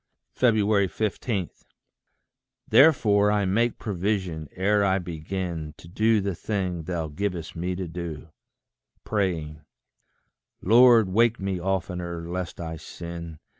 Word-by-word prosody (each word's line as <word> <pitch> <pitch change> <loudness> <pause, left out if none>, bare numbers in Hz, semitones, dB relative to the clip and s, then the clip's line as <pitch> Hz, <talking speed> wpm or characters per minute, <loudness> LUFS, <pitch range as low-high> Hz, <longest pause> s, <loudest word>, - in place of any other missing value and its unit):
15. 105 -2 +1 1.2
Therefore 105 -9 +5
I 105 -1 +1
make 115 +5 +1
provision, 95 -6 -2
ere 100 +2 +2
I 95 -1 +2
begin 85 -2 -5
To - - -14
do 110 +5 +2
the 100 0 -2
thing 90 -3 -3
thou 85 -2 -2
givest 85 +1 -4
me 90 +2 -2
to 95 -1 -4
do, 85 -1 -7 0.7
Praying, 85 -7 -2 1.0
Lord, 120 -2 +6
wake 115 +4 +3
me 95 -1 -2
oftener, 90 -2 -3
lest 90 0 -5
I 80 -1 -5
sin. 85 0 -8
95 Hz, 110 wpm, -25 LUFS, 85-105 Hz, 1.2 s, Lord